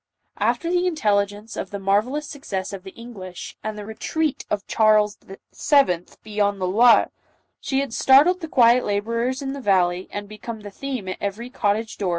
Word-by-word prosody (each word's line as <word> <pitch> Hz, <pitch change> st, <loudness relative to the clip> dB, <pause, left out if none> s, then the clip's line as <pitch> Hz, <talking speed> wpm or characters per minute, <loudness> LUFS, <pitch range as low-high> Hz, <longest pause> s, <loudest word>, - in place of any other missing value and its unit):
After 340 Hz, 0 st, 0 dB
the 360 Hz, 0 st, +2 dB
intelligence 210 Hz, -, 0 dB
of -, -, -4 dB
the 205 Hz, -, -5 dB
marvellous 215 Hz, +10 st, 0 dB
success 200 Hz, -11 st, -5 dB
of 195 Hz, -, -6 dB
the 190 Hz, -, -10 dB
English, 200 Hz, -7 st, -9 dB
and 215 Hz, 0 st, -4 dB
the 210 Hz, -, -7 dB
retreat 300 Hz, +7 st, -2 dB
of 205 Hz, -1 st, -2 dB
Charles 215 Hz, -1 st, +3 dB
VII. 195 Hz, -, 0 dB, 0.2 s
beyond 205 Hz, -2 st, 0 dB
the 185 Hz, -, -1 dB
Loire, 225 Hz, +6 st, +5 dB, 0.6 s
had 270 Hz, -3 st, 0 dB
startled 290 Hz, +10 st, +5 dB
the 325 Hz, -, -6 dB
quiet 245 Hz, -3 st, +5 dB
laborers 230 Hz, +6 st, -1 dB
in 270 Hz, 0 st, -3 dB
the 280 Hz, -, -6 dB
valley, 185 Hz, -4 st, +2 dB
and 205 Hz, 0 st, -6 dB
become 215 Hz, +2 st, -8 dB
the 205 Hz, -1 st, -9 dB
theme 255 Hz, -3 st, -5 dB
at 185 Hz, -, -4 dB
every 220 Hz, +5 st, -4 dB
cottage 215 Hz, 0 st, -1 dB
door 195 Hz, -, -1 dB
215 Hz, 170 wpm, -23 LUFS, 200-260 Hz, 0.6 s, Loire